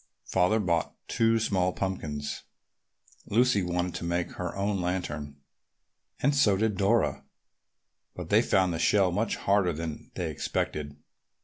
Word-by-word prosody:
Father 95 Hz, +4 st, +2 dB
bought 85 Hz, -5 st, 0 dB
two 115 Hz, 0 st, +2 dB
small 95 Hz, -5 st, +1 dB
pumpkins. 75 Hz, -7 st, -3 dB, 0.9 s
Lucy 120 Hz, -1 st, +3 dB
wanted 90 Hz, 0 st, -1 dB
to 85 Hz, -, -5 dB
make 85 Hz, 0 st, -1 dB
her 90 Hz, -1 st, -5 dB
own 100 Hz, -1 st, -1 dB
lantern 75 Hz, -5 st, -3 dB, 0.9 s
and 140 Hz, +2 st, +3 dB
so 105 Hz, -8 st, +4 dB
did 110 Hz, 0 st, +1 dB
Dora, 100 Hz, +5 st, +1 dB, 0.9 s
but -, -, -7 dB
they -, -, +6 dB
found 95 Hz, -2 st, +2 dB
the 80 Hz, -, -3 dB
shell 95 Hz, +1 st, +3 dB
much 105 Hz, +5 st, 0 dB
harder 100 Hz, -3 st, +2 dB
than 80 Hz, 0 st, -6 dB
they -, -, -2 dB
expected. 75 Hz, -1 st, -3 dB
95 Hz, 135 wpm, -28 LUFS, 85-105 Hz, 0.9 s, they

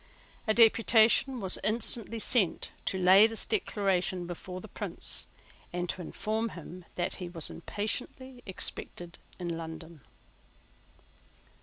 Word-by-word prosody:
A 215 Hz, -, +4 dB
deputation 230 Hz, +2 st, +5 dB
was 190 Hz, -3 st, -1 dB
instantly 230 Hz, +1 st, +3 dB
sent 220 Hz, -4 st, +1 dB
to 190 Hz, -, -1 dB
lay 190 Hz, +3 st, +7 dB
this 225 Hz, -1 st, -1 dB
Declaration 190 Hz, -, 0 dB
before 180 Hz, +1 st, -7 dB
the -, -, -10 dB
Prince, -, -, -3 dB, 0.4 s
and 175 Hz, 0 st, -3 dB
to 185 Hz, -, -3 dB
inform 220 Hz, +6 st, -3 dB
him 175 Hz, 0 st, -10 dB
that 175 Hz, -, -2 dB
he 180 Hz, -2 st, -6 dB
was 165 Hz, -3 st, -2 dB
impatiently 245 Hz, +7 st, -4 dB
expected 175 Hz, -2 st, -3 dB, 0.2 s
in 175 Hz, -2 st, -4 dB
London. 160 Hz, -1 st, -9 dB
190 Hz, 120 wpm, -30 LUFS, 175-225 Hz, 0.4 s, lay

